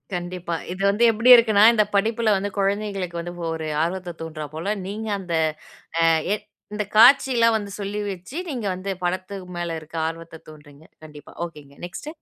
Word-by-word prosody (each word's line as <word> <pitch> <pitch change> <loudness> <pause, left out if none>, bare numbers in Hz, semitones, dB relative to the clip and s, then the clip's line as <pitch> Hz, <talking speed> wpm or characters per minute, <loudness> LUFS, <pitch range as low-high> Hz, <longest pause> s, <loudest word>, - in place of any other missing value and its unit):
கண்டிப்பா. 175 -1 -4 0.2
இது 185 +2 -6
வந்து 210 +4 +1
எப்பிடி 230 +4 +4
இருக்குனா, 220 -3 +5
இந்த 215 -2 +4
படிப்புல 220 +2 +1
வந்து 205 +1 -3
குழந்தைகளுக்கு 195 -3 -1
வந்து 175 +1 -7 0.2
ஒரு 160 -1 -4 0.2
ஆர்வத்த 175 0 -4
தூண்ட்றாபோல 160 +4 -4
நீங்க 215 +2 -5
அந்த 180 -3 -6 0.7
அ - - +3 0.3
எ 210 - +2 0.4
இந்த 210 0 -1
காட்சி 265 +4 +7
எல்லாம் 230 -1 +4
வந்து 205 -2 -5
சொல்லிவச்சி 200 - -5
நீங்க 245 -7 -4
வந்து 190 +2 -5
படத்துக்கு 185 +1 -3
மேல 170 -1 -3
இருக்க 155 +1 -11
ஆர்வத்த 165 0 -7
தூண்டுறீங்க. 150 0 -15 0.2
கண்டிப்பா. 150 -2 -13
ஒகே 160 -3 -12
ங்க 140 - -19
நெக்ஸ்ட். 235 +11 -8
190 Hz, 160 wpm, -23 LUFS, 165-210 Hz, 0.7 s, காட்சி